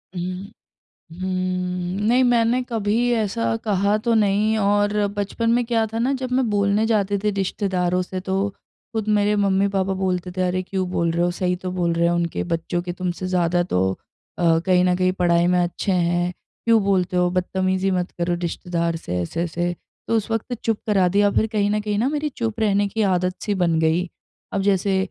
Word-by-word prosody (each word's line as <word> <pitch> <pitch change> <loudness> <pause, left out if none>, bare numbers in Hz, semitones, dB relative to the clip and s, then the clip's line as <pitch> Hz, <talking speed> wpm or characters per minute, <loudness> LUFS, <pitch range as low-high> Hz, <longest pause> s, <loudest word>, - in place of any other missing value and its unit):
हुँ। 185 +3 -5 0.7
हुँ। 185 - -2 0.8
नहीं, 250 +3 +4
मैंने 240 0 +3
कभी 225 +2 +1
ऐसा 190 - 0
कहा 200 0 +2
तो 235 - +3
नहीं 215 +1 +2
और 205 0 +2 0.2
बचपन 205 +3 -1
में 245 +1 +2
क्या 230 -1 +1
था 225 +1 -4
ना 255 +4 +1
जब 255 -1 -3
मैं 255 -2 +1
बोलने 205 +1 +2
जाती 205 -3 +1
थी 210 - +2
रिश्तेदारों 185 -2 0
से 185 +1 -5
तो 190 +1 -2 0.6
खुद 220 -1 -2
मेरे 210 0 +2
मम्मी-पापा 195 -1 +1
बोलते 185 -1 -2
थे, 185 +1 -3
"अरे! 185 0 0
क्यों 185 -1 -3
बोल 170 -2 +1
रहे 170 +1 0
हो 175 - +2
सही 180 0 -1
तो 185 0 -5
बोल 175 -2 0
रहे 170 0 +1
हैं। 170 - +2
उनके 170 -1 -1
बच्चों 165 +1 -2
के 175 0 -5
तुमसे 180 +1 -3
ज़्यादा 175 -1 +1
तो 95 - 0 0.4
अ, 165 -2 +3
कहीं 180 -1 +4
न 180 0 +3
कहीं 185 0 +2
पढ़ाई 175 -2 +2
में 180 0 +3
अच्छे 175 +3 -1
हैं। 175 0 +1 0.3
क्यों 230 -1 +5
बोलते 185 -2 +1
हो 180 0 +3
बदतमीज़ी 185 +1 0
मत 180 -1 -1
करो 175 0 0
रिश्तेदार 170 0 -2
से 90 - -4
ऐसे-ऐसे।" 175 - -2 0.3
तो 230 - +1
उस 220 +1 -3
वक़्त 225 +2 -2
चुप 225 -2 +1
करा 195 -4 +3
दिया 205 +3 +3
फिर 220 - +2
कहीं 210 -2 0
न 210 +1 +1
कहीं 210 -1 -2
न 255 +5 +1
मेरी 300 0 -1
चुप 230 -4 -4
रहने 205 -2 +2
की 220 +3 -2
आदत-सी 185 +3 -1
बन 170 -3 +1
गई। 160 +3 +1 0.5
अब 200 - 0
जैसे 195 0 +2
190 Hz, 195 wpm, -22 LUFS, 180-210 Hz, 0.8 s, क्यों